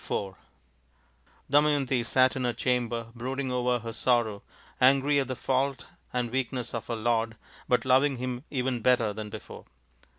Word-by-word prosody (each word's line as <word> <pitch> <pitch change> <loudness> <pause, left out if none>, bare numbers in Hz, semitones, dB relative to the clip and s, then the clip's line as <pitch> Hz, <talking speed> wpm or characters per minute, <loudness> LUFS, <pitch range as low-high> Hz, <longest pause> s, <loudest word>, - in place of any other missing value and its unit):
IV 95 -1 -3 1.1
Damayanti 140 -3 +3
sat 130 +2 +3
in 130 - -2
her 120 -1 0
chamber 120 -1 -1
brooding 130 +2 -3
over 125 0 +1
her 115 -1 -7
sorrow, 115 -4 +1 0.4
angry 140 +2 +5
at 135 - -1
the 130 - -3
fault 135 +1 -1 0.3
and 120 -2 -1
weakness 125 -2 -2
of 115 - -4
her 115 - -2
lord, 115 0 0 0.3
but 125 - +2
loving 130 +1 +3
him 125 0 -4
even 125 -3 -1
better 115 -3 +3
than 105 0 -6
before. - - -10
125 Hz, 155 wpm, -28 LUFS, 115-130 Hz, 1.1 s, angry